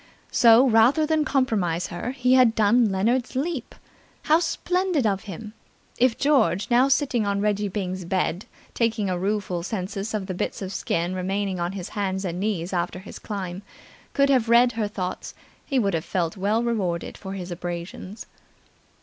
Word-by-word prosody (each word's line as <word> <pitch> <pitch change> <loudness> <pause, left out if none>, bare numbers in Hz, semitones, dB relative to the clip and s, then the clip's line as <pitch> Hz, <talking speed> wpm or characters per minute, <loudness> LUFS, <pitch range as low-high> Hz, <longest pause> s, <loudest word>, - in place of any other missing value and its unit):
So 235 +2 +6
rather 245 +7 +4
than 310 0 +1
compromise 205 - 0
her, 175 +7 -4
he 250 -1 +1
had 250 -3 +5
done 220 +1 +3
Leonard's 235 +7 0
leap! 280 -1 -3 0.5
How 310 +2 +4
splendid 350 -2 0
of 195 -1 0
him! 210 +2 -8 0.5
If 245 -1 +3
George, 255 - +2
now 250 +3 +5
sitting 265 -4 +1
on 200 0 0
Reggie 205 0 0
Byng's 185 -2 -4
bed 180 +1 -1 0.3
taking 225 -4 0
a 180 - -1
rueful 195 -2 -1
census 195 +2 -4
of 205 -3 -2
the 190 - -4
bits 180 - -3
of 190 +1 -5
skin 170 0 -1
remaining 190 0 -2
on 175 +2 -2
his 185 -3 -6
hands 195 -2 -2
and 175 0 -3
knees 190 -3 -2
after 175 0 -1
his 190 +2 -10
climb, 190 -3 -5 0.5
could 280 0 +3
have 245 -4 +2
read 240 +1 +6
her 225 -2 -2
thoughts, 185 -3 -5 0.3
he 275 - 0
would 200 -6 +1
have 160 -1 -1
felt 170 -3 -2
well 210 +4 0
rewarded 190 -8 -2
for 190 -1 -7
his 185 -2 -6
abrasions. 175 +3 -6
205 Hz, 170 wpm, -24 LUFS, 185-240 Hz, 0.5 s, So